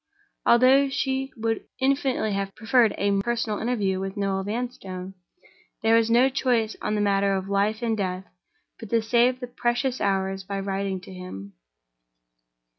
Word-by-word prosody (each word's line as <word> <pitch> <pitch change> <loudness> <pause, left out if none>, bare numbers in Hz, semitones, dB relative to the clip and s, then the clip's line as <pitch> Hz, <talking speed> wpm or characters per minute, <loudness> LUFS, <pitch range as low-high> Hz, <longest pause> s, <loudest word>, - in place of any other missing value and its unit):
Although 260 +3 +5
she 270 -1 -1
would 225 0 -1
infinitely 265 -5 +1
have 195 0 -3
preferred 230 0 +3
a 200 0 +1
personal 230 -1 -1
interview 205 -6 0
with 195 +2 -5
Noel 195 -1 -1
Vanstone, 195 -4 -5 0.7
there 225 0 +5
was 230 0 +3
no 240 +3 +5
choice 245 -5 0
on 210 0 -1
a - - +1
matter 200 -1 +2
of 190 0 -3
life 205 +3 0
and 225 -1 +1
death 185 -2 -3 0.5
but 225 - -9
to 230 0 +2
save 245 +3 +3
the 250 - -4
precious 245 +1 -1
hours 195 -1 0
by 195 +1 -4
writing 195 -1 -2
to 185 - -11
him. 100 - -9
215 Hz, 155 wpm, -25 LUFS, 195-245 Hz, 0.7 s, Although